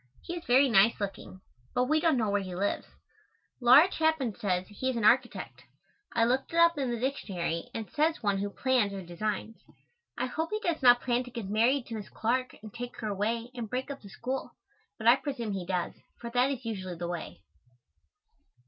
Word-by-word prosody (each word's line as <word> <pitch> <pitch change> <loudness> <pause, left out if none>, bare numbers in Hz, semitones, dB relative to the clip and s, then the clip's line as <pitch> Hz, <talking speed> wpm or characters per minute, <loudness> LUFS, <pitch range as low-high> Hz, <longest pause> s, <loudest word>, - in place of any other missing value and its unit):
He 345 - -5
is 340 - -6
very 265 +3 +5
nice 225 -1 +4
looking, 195 -2 -6 0.3
but 250 - +3
we 310 +5 +2
don't 315 -3 +3
know 220 -4 +1
where 205 0 +1
he 185 -2 -6
lives. 200 +3 -1 0.7
Laura 260 +8 +8
Chapin 315 - +1
says 185 -3 -1
he 235 +6 -3
is 260 - -1
an 230 - -2
architect. 245 +3 +2 0.5
I 230 - +4
looked 255 +3 0
it - - -1
up 335 0 +6
in 265 -3 0
the 240 -1 -2
dictionary 185 -10 -2
and 225 - -3
it - - -26
says 310 -2 +1
one 200 -2 +1
who 205 +1 -2
plans 240 -2 +1
or 195 -1 -5
designs. 210 +5 -4 0.6
I - - 0
hope 320 +6 -3
he 425 - -2
does 340 -7 -1
not 245 -1 +7
plan 245 0 +1
to - - -9
get 235 -4 -6
married 240 +5 +3
to - - -8
Miss 215 -3 -6
Clark 255 +3 -1
and 215 - -10
take 245 0 -7
her 215 - -2
away 225 +4 -2
and 235 -4 -5
break 260 +4 -3
up 280 - -8
the 200 - -12
school, 255 +6 -5 0.4
but - - -8
I 240 +3 +7
presume 265 -7 -4
he 185 -3 -4
does, 180 -2 -1 0.3
for 235 0 -7
that 250 +2 +3
is 260 -3 -4
usually 190 -5 -4
the 170 +1 -4
way. 175 -1 -6
235 Hz, 210 wpm, -29 LUFS, 205-260 Hz, 0.7 s, Laura